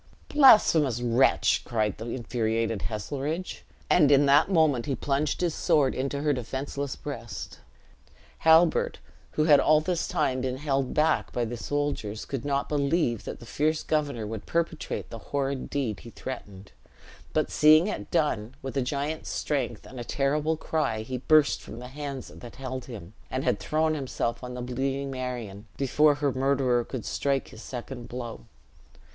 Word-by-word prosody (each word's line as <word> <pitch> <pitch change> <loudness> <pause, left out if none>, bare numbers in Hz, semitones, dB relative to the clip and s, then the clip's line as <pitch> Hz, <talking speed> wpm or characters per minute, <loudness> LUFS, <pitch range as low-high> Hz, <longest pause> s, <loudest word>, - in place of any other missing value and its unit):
"Blasphemous 170 - +6
wretch!" 120 +2 +3
cried 110 -4 -1
the 110 - -6
infuriated 115 -2 -1
Heselrigge; 145 - -4 0.3
and 150 -5 +5
in 140 0 +6
that 140 +6 +5
moment 155 -9 +3
he 140 - 0
plunged 140 +4 -1
his 175 -3 +1
sword 145 -4 +2
into 140 +2 -2
her 150 -1 +3
defenseless 135 +3 -4
breast. - - -7 0.8
Halbert, 160 +1 +4 0.4
who 155 - +2
had 150 -2 +6
all 155 0 +5
this 170 +1 -1
time 130 -1 0
been 130 0 -2
held 135 -2 -1
back 155 +1 +2
by 120 - -1
the 120 +2 -4
soldiers, 130 -5 -3
could 135 -4 -4
not 140 -1 0
believe 140 - 0
that - - -6
the 120 - -11
fierce 155 +5 0
governor 145 -7 -1
would 110 0 -6
perpetrate 165 -1 -2
the 115 - -6
horrid 140 -1 -2
deed 120 -9 -2
he 120 - -11
threatened; 105 -6 -8 0.6
but - - 0
seeing 155 +2 +6
it 210 - -4
done, 130 - 0
with 135 0 -5
a 135 - +2
giant's 145 +4 -3
strength 125 -7 -2
and 130 - -10
a - - -4
terrible 150 +5 0
cry 140 -9 -1
he 125 +2 -4
burst 155 +2 +4
from - - -10
the 125 +1 -8
hands 140 -1 -6
that 120 - -11
held 130 -1 -5
him, 105 -7 -9 0.2
and 130 +1 -2
had - - +1
thrown 155 +1 +1
himself 130 -4 -3
on 125 0 -6
the 125 - -5
bleeding 135 +2 -2
Marion, 120 -6 -5
before 145 +2 +3
her 140 -2 0
murderer 130 -2 +2
could 125 -1 -6
strike 140 -2 -1
his 110 - -12
second 120 -1 -7
blow. 120 - -6
135 Hz, 165 wpm, -27 LUFS, 120-150 Hz, 0.8 s, Blasphemous